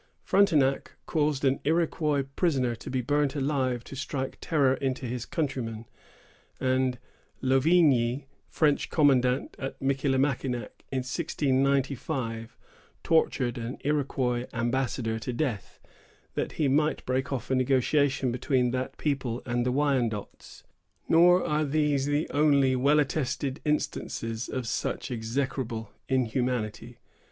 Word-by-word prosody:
Frontenac 155 -9 +2
caused 150 -3 0
an 135 0 +2
Iroquois 155 -2 +1
prisoner 135 -9 +1
to 115 - -9
be 130 -1 -1
burnt 145 +2 +1
alive 135 -4 0
to 135 - -10
strike 135 -1 -4
terror 140 -5 +2
into 130 -1 -2
his 120 0 -4
countrymen; 120 -8 -3 0.7
and 130 -1 +1 0.4
Louvigny, 135 -2 +3 0.2
French 150 -3 +1
commandant 130 -4 +2
at 135 - -5
Michillimackinac, 135 -3 0 0.2
in 130 -1 -1
1695, 135 -5 -1 0.5
tortured 130 -7 +1
an 115 +2 -5
Iroquois 130 -4 0
ambassador 120 -1 -1
to 125 - -4
death, 120 -5 -3 0.5
that - - -2
he 150 - +1
might 150 +3 +1
break 130 +1 -1
off 130 -2 -3
a - - +3
negotiation 135 +1 +2
between 125 0 +1
that 130 +1 -3
people 130 -5 -2
and 120 -1 0
the - - +2
Wyandots. 125 -7 -2 0.4
Nor 175 +2 +5
are 150 +1 +1
these 145 -2 +1
the 145 +2 0
only 140 -3 +3
well 140 +4 +4
attested 140 -1 -1
instances 115 -6 -2
of 130 -3 -3
such 125 - -2
execrable 115 -1 -3 0.2
inhumanity. 125 -3 -1
135 Hz, 120 wpm, -28 LUFS, 125-145 Hz, 0.7 s, Nor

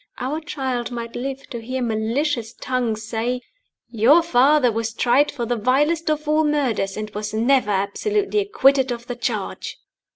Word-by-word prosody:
Our 275 +5 -2
child 260 -6 -3
might 235 -1 -6
live 270 +2 -5
to 235 -3 -5
hear 255 +2 -3
malicious 230 +2 -1
tongues 240 -4 -2
say, 235 +3 -2 0.5
"Your 245 +8 +4
father 275 -3 +4
was 225 0 -3
tried 255 +6 +3
for 240 - -4
the 240 - -1
vilest 295 +8 +1
of 305 0 -1
all 305 +1 +3
murders, 255 -10 0
and 215 0 -5
was 210 +1 -4
never 250 +1 +2
absolutely 400 - 0
acquitted 275 -11 +3
of 235 0 -5
the 245 - -5
charge." 240 - -4
250 Hz, 160 wpm, -22 LUFS, 230-290 Hz, 0.5 s, Your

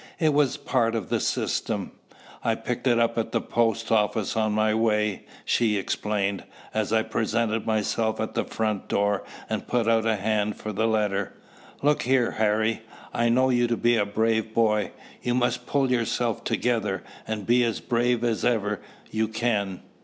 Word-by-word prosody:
It 155 -4 +2
was 145 -3 +3
a - - -10
part 120 -5 +1
of 110 -5 -3
the - - +1
system. - - -1 0.5
"I - - +2
picked - - -3
it 120 -2 +4
up 115 0 +2
at 115 - -2
the - - +1
post 115 -1 0
office 105 -1 +1
on 110 -1 +1
my 110 0 +2
way," 105 -2 +1 0.2
she 110 -3 +2
explained, 100 0 -1 0.3
as 110 -1 -1
I 110 0 +3
presented 115 0 -1
myself 110 0 0
at 110 - -2
the - - 0
front 110 -3 -2
door 100 0 +1 0.2
and - - -3
put 120 -2 +1
out 115 -1 +3
a 110 - +3
hand 105 +1 0
for 110 - -6
the 110 +3 +1
letter. 105 -3 0 0.5
"Look 150 +1 +3
here, 125 -1 +2
Harry: 110 +1 +1 0.3
I 120 0 +2
know 130 +2 +3
you 120 -1 +3
to 120 -1 0
be 120 0 +3
a 110 - +3
brave 110 +1 0
boy. 105 -3 +2 0.3
You 120 0 0
must 125 -1 0
pull 135 -2 +1
yourself 120 -1 0
together, 105 -6 0 0.2
and 110 -2 -3
be 120 +1 +4
as 115 -2 0
brave 120 0 +1
as 115 -2 0
ever 105 -4 +1 0.3
you 110 0 0
can. 105 -4 -1
110 Hz, 180 wpm, -26 LUFS, 105-120 Hz, 0.5 s, it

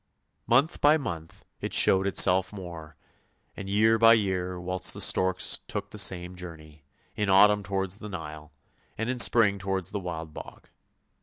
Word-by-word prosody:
Month 135 +7 +1
by 150 +2 +5
month 85 - -8
it - - -5
showed 95 +1 +3
itself 95 -1 +3
more, 85 -6 -10 0.6
and 100 -1 -8
year 110 +3 +2
by 115 0 +7
year 90 -4 -2
whilst 90 +1 -1
the - - -7
storks 95 -1 +2
took - - -6
the - - -7
same 90 -1 0
journey, 80 -4 -12 0.3
in 105 -1 -2
autumn 105 +2 +5
towards 95 +1 -3
the 105 - -9
Nile, 75 -4 -9 0.5
and 115 +3 -2
in 130 - -5
spring 105 -4 +3
towards 95 -1 -4
the 105 - -4
Wild 80 -4 -7
Bog. - - -12
95 Hz, 160 wpm, -26 LUFS, 90-105 Hz, 0.6 s, by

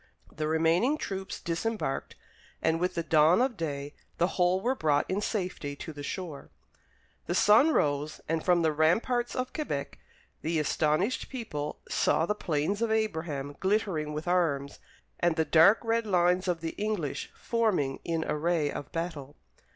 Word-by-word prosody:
The 155 0 -3
remaining 165 - +2
troops 190 -7 -5
disembarked, 175 -3 -3 0.4
and 160 0 +1
with 180 +1 -1
the 170 - -1
dawn 160 +3 +5
of 255 -1 +1
day, 145 -4 -4 0.2
the 175 +2 +2
whole 180 0 +2
were 245 +7 +1
brought 150 - +1
in 195 +2 -1
safety 180 -9 -3
to 160 - -8
the 145 - -8
shore. 160 -1 -6 0.8
The 175 - -1
sun 215 +11 +6
rose, 145 - 0
and 160 0 -1
from 175 -2 +3
the 160 - +3
ramparts 220 - +1
of 255 0 -3
Quebec 305 -2 -4 0.4
the 160 +1 -1
astonished 155 - 0
people 150 - -5
saw 160 - +2
the 210 - 0
Plains 175 +2 -1
of 230 - +1
Abraham 160 -10 -2
glittering 190 -6 0
with 155 +3 -5
arms, 150 -6 0 0.4
and 170 -1 +2
the 160 -1 +1
dark 165 +8 +6
red 230 0 0
lines 180 -1 +2
of 175 -3 0
the 165 -1 -3
English 210 -10 -2
forming 205 - 0
in 165 -1 -1
array 155 -1 0
of 145 - -7
battle. 160 -4 -5
170 Hz, 160 wpm, -29 LUFS, 155-205 Hz, 0.8 s, sun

